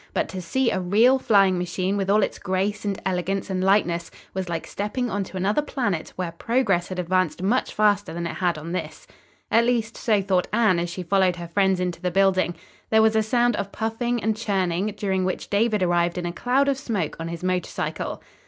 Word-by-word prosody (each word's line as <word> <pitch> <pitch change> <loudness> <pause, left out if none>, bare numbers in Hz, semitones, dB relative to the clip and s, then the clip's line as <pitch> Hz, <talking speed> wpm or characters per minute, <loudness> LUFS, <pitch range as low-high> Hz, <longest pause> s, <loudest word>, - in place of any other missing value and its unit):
But - - 0
to 185 - -5
see 260 +7 0
a - - 0
real 220 +9 +4
flying 195 -6 +4
machine 180 +2 -1
with 195 -1 -1
all 210 +1 +4
its - - -3
grace 195 +3 -1
and 200 -2 -2
elegance 190 +1 -1
and 185 -1 -1
lightness 180 -3 +2 0.2
was 185 -2 -3
like 165 -1 -3
stepping 225 +4 -3
onto 195 -1 -3
another 205 +9 +1
planet 220 - -2
where 180 -2 -3
progress 195 -1 0
had 185 - -6
advanced 180 -2 0
much 235 +7 +1
faster 205 -2 +2
than 170 +1 -4
it 170 - -3
had 175 -3 0
on 160 +2 -7
this. 185 - -5 0.5
At 230 - +5
least, 235 -2 0
so 215 -3 +2
thought 190 -2 +1
Anne 210 -5 +3
as 170 0 -2
she 180 +2 -5
followed 185 0 +2
her 175 -1 -7
friends 190 +1 +2
into 180 -2 -3
the 180 - 0
building. 185 -1 +2 0.3
There 220 0 +5
was 220 0 +3
a 220 - +4
sound 240 +2 +2
of 200 0 -3
puffing 230 +1 -2
and 220 0 +1
churning, 195 -4 0
during 190 -2 0
which 185 0 -3
David 210 -1 +2
arrived 175 0 +1
in 175 - -3
a 170 - -3
cloud 260 +7 +1
of 275 -1 +1
smoke 205 - -2
on 165 - -4
his 170 +1 -6
motor 185 -1 0
cycle. - - -4
195 Hz, 215 wpm, -24 LUFS, 180-215 Hz, 0.5 s, At